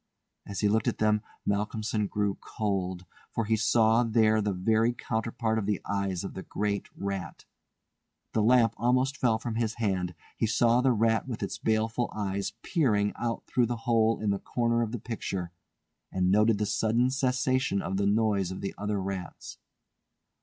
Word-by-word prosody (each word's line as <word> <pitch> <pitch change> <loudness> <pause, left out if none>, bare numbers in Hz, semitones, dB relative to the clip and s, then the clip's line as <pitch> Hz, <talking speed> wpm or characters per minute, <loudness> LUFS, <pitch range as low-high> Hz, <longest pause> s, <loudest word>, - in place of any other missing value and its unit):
As 100 - -4
he 105 - +3
looked 110 +1 +1
at - - 0
them, 105 0 +2 0.2
Malcolmson 105 +1 -1
grew 105 -1 -1
cold, 95 -4 -3 0.2
for 115 - -2
he 110 +1 +2
saw 110 +1 +4
there 110 -2 +3
the 105 0 0
very 110 +5 +2
counterpart 110 -1 -1
of 100 - -3
the 105 -3 0
eyes 100 -3 -1
of 95 - -6
the 95 - -6
great 100 +1 -2
rat. 100 -2 -5 0.9
The 110 - +2
lamp 115 0 +4
almost 130 +3 +2
fell 115 -5 +2
from 115 0 -4
his 115 -1 -1
hand, 95 -6 -1 0.2
he 115 - 0
saw 120 +2 +3
the 130 0 +3
rat 115 +1 +2
with 120 -4 -4
its - - -4
baleful 110 +2 0
eyes 100 -1 -2
peering 105 - +1
out 115 -1 -3
through 125 -2 +1
the 120 0 -2
hole 115 -1 +3
in 105 -1 0
the 100 - -1
corner 115 -1 0
of 115 -2 -1
the 120 - -3
picture, 100 -6 -4 0.6
and 90 0 +1
noted 105 +2 +4
the 105 - 0
sudden 115 +4 +1
cessation 130 -4 +1
of 95 - -2
the 100 0 +1
noise 100 -3 +2
of 95 - -6
the 100 - -3
other 105 0 -1
rats. 95 -2 -6
110 Hz, 175 wpm, -28 LUFS, 100-115 Hz, 0.9 s, saw